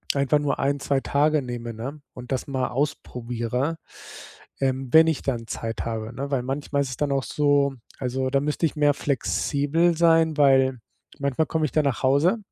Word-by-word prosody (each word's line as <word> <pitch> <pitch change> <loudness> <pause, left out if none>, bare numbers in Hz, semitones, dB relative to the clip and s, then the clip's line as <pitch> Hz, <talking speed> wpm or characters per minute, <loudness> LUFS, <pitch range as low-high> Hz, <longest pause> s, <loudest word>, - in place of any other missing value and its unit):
einfach 140 +1 +2
nur 145 -1 -1
1, 140 +1 0
2 140 0 0
Tage 150 +2 +2
nehme, 120 -2 -6
ne, 135 +7 -7
und 125 +1 -10
das 130 - -2
mal 130 -2 -1
ausprobiere, 125 +1 -2 0.8
ähm, 135 0 0
wenn 160 0 +8
ich 160 -4 0
dann 120 -4 -2
Zeit 115 0 -4
habe, 115 0 -4
ne? 140 +3 -5
Weil 135 -3 +1
manchmal 140 +2 -2
ist 135 - -5
es 130 - -6
dann 145 -1 -1
auch 135 -1 0
so 145 -1 +1 0.2
also, 130 0 -1
da 140 - +3
müsste 150 +3 -1
ich 155 - -2
mehr 145 -1 +3
flexibel 145 +4 0
sein, 165 -1 +4
weil 135 -3 +4 0.4
manchmal 140 +2 0
komme 160 -1 0
ich 150 - -3
dann 155 -1 +2
nach 135 -5 -1
Hause, 145 - +3
140 Hz, 185 wpm, -24 LUFS, 130-150 Hz, 0.8 s, wenn